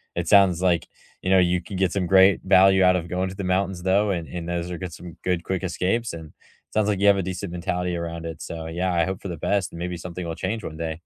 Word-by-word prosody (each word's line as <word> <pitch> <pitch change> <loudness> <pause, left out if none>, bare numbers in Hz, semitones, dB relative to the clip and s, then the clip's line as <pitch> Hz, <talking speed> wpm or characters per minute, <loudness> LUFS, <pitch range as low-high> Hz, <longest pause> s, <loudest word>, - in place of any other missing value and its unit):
it 85 -1 -2
sounds, 95 -4 +5
like, 90 -3 +1 0.3
you 95 - -2
know, 95 -1 +6
you 90 0 +2
can 95 +1 -6
get 95 -2 +1
some 95 -3 0
great 95 +1 +5
value 95 0 +5
out 90 0 +5
of 85 0 -4
going 90 +1 -2
to 95 - -8
the 100 - -5
mountains 95 -1 -1
though, 100 +2 +2
and 85 -4 -3
and 85 -1 -6
those 85 0 -2
are 85 - -5
some 85 0 -11
good 90 -2 0
quick 95 0 -3
escapes 95 +6 -1
and 80 -1 -8
it - - -29
sounds 105 -1 +2
like 100 -2 0
you 100 - +3
have 100 - +7
a 95 - -1
decent 95 0 -5
mentality 90 0 -2
around 85 -1 -5
it. 80 -2 -7
So, 80 -1 -6
yeah, 90 +2 -1
I 85 -1 +2
hope 95 0 -4
for 100 - -6
the 85 - -5
best 100 +2 0
and 85 - -9
maybe 90 0 -3
something 90 +1 -6
will 80 - -4
change 110 +4 -3
one 80 - -6
day. 80 -1 -3
90 Hz, 275 wpm, -24 LUFS, 85-95 Hz, 0.3 s, have